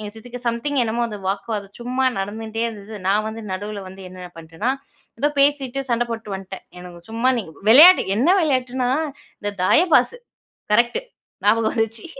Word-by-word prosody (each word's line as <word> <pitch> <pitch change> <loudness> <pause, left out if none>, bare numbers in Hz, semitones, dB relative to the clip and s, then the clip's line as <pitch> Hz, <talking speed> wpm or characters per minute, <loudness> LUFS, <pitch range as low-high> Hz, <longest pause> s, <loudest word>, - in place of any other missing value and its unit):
எங்க 210 -1 -6
சித்திக்கு 245 +2 -9
சம்திங் 270 +5 -1
என்னமோ 235 +1 -1
அந்த 210 - -7
வாக்குவாதம் 200 0 -4
சும்மா 255 +2 -1
நடந்துன்ட்டே 220 +3 -4
இருந்தது. 215 -1 -8
நான் 210 +2 +2
வந்து 220 +1 -7
நடுவ்ல 205 +2 -5
வந்து 190 +1 -11
என்ன 185 0 -12
நா 180 - -10
பண்ட்டேன்னா, 165 +9 -3 0.5
ஏதோ 290 - +2
பேசிட்டு 275 -2 +2
சண்ட 235 0 +2
போட்ட்டு 225 -3 -5
வந்த்ட்டேன். 190 0 -9 0.2
எனக்கு 175 -1 -11
சும்மா 230 +3 +1
நீங்க 185 -8 -6 0.2
வெளையாட்டுக் 310 - +8
என்ன 260 - +2
வெளையாட்டுனா? 255 -5 0 0.5
இந்த 205 - -2
தாய 250 - +5
பாஸு 485 - +3 0.5
கரெக்ட்‌டு. 235 - +2 0.4
ஞாபகம் 220 +2 +3
வந்துர்ச்சு 225 0 0
225 Hz, 160 wpm, -21 LUFS, 200-245 Hz, 0.5 s, வெளையாட்டுக்